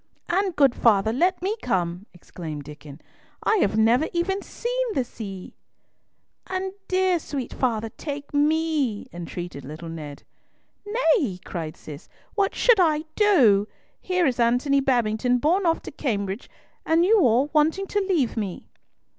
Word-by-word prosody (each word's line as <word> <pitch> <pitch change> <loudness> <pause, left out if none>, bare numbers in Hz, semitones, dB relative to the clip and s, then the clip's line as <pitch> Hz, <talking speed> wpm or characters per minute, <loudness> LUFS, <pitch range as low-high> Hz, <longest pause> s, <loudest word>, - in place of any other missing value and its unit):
"And, 375 0 0
good 275 -4 +4
father, 220 -2 +3
let 355 +7 +1
me 405 +3 0
come," 180 -2 -2
exclaimed 160 -4 -8
Diccon; 150 0 -12 0.4
"I 435 - +3
have 215 - +1
never 235 +7 +4
even 385 +3 0
seen - - -3
the 260 - +2
sea!" 200 -6 -8 0.9
"And 375 0 -3
dear, 370 -1 +2
sweet 275 -5 -5
father, 225 -3 -1
take 285 +4 -7
me," 295 -6 +1
entreated 175 -3 -7
little 155 +5 -8
Ned. 150 -3 -8 0.6
"Nay," 410 - +1
cried 160 -3 -5
Cis, 150 -1 -11 0.2
"what 400 -2 0
should 475 -4 +4
I 310 -4 +3
do? 245 - +4 0.3
Here 365 -1 +1
is 255 -4 0
Antony 250 +4 +3
Babington 245 -2 +1
borne 345 +8 +2
off 330 - +1
to - - -7
Cambridge, 205 -7 -3 0.3
and 330 +2 +3
you 435 +3 +5
all 260 - +3
wanting 315 +6 +2
to 410 - -1
leave 350 - 0
me." 205 -6 -5
265 Hz, 145 wpm, -24 LUFS, -, 0.9 s, you